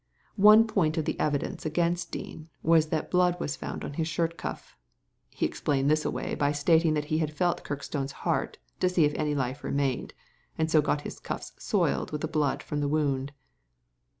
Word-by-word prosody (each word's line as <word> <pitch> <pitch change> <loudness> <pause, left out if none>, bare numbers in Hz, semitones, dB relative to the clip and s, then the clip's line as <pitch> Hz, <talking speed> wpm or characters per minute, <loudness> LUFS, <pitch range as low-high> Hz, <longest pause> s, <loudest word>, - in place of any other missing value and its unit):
One 215 +2 +9
point 175 -8 +1
of 160 - 0
the - - -2
evidence 145 -2 -1
against 170 +2 0
Dean 155 +1 -7
was 160 -1 +4
that 155 0 -2
blood 180 -1 +3
was 145 - -2
found - - -6
on - - -6
his 160 +2 -1
shirt 165 +1 -1
cuff. - - -7 0.5
He - - -2
explained 140 0 0
this 155 0 +2
away - - -2
by 145 0 +1
stating 160 +2 +3
that 150 -1 -1
he 155 - +2
had 155 -2 -1
felt 175 -1 +1
Kirkstone's 140 -1 -4
heart - - 0 0.2
to 185 - +3
see 175 -4 +3
if 145 - +1
any 150 -1 -1
life 130 0 -2
remained, 140 -2 -1 0.4
and 160 0 0
so 155 - +6
got 145 0 0
his - - -7
cuffs - - -6
soiled - - 0
Mrith 150 -1 -3
the 160 - -1
blood 150 -3 0
from 150 - -3
the 145 - 0
wound." 140 -2 0
155 Hz, 195 wpm, -28 LUFS, 145-165 Hz, 0.5 s, One